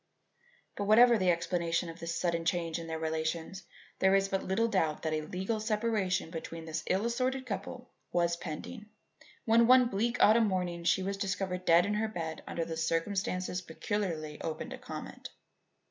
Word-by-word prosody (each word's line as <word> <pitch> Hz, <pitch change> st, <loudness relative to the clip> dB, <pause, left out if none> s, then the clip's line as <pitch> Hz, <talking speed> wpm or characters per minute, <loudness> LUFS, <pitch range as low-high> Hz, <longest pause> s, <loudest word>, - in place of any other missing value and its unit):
But 205 Hz, -, -3 dB
whatever 235 Hz, +3 st, +7 dB
the 185 Hz, -1 st, +2 dB
explanation 170 Hz, 0 st, 0 dB
of 165 Hz, +1 st, -9 dB
this 165 Hz, 0 st, -4 dB
sudden 170 Hz, -2 st, 0 dB
change 165 Hz, -1 st, -1 dB
in 165 Hz, -, -7 dB
their 160 Hz, 0 st, -3 dB
relations, 160 Hz, +3 st, -3 dB, 0.3 s
there 190 Hz, 0 st, +4 dB
is 195 Hz, 0 st, +2 dB
but 195 Hz, -1 st, -1 dB
little 225 Hz, +5 st, +1 dB
doubt 165 Hz, -8 st, 0 dB
that 160 Hz, -1 st, -1 dB
a 155 Hz, -, 0 dB
legal 190 Hz, +8 st, -3 dB
separation 215 Hz, -5 st, 0 dB
between 165 Hz, -1 st, -6 dB
this 160 Hz, 0 st, -4 dB
ill 195 Hz, +4 st, +1 dB
assorted 255 Hz, +2 st, -1 dB
couple 245 Hz, +3 st, -5 dB, 0.2 s
was 170 Hz, -1 st, +2 dB
pending, 185 Hz, +7 st, -7 dB, 0.6 s
when 230 Hz, +1 st, +5 dB
one 250 Hz, -1 st, +6 dB
bleak 235 Hz, +4 st, 0 dB
autumn 220 Hz, +1 st, +6 dB
morning 180 Hz, -3 st, -2 dB
she 190 Hz, -, +3 dB
was 195 Hz, +1 st, -2 dB
discovered 190 Hz, -2 st, -2 dB
dead 170 Hz, +2 st, +6 dB
in 205 Hz, -, -1 dB
her 215 Hz, +1 st, 0 dB
bed 165 Hz, -7 st, -5 dB
under 165 Hz, -1 st, -3 dB
circumstances 180 Hz, +3 st, -1 dB
peculiarly 165 Hz, -4 st, -3 dB
open 160 Hz, -1 st, -4 dB
to -, -, -7 dB
comment. -, -, -8 dB
185 Hz, 170 wpm, -31 LUFS, 165-210 Hz, 0.6 s, whatever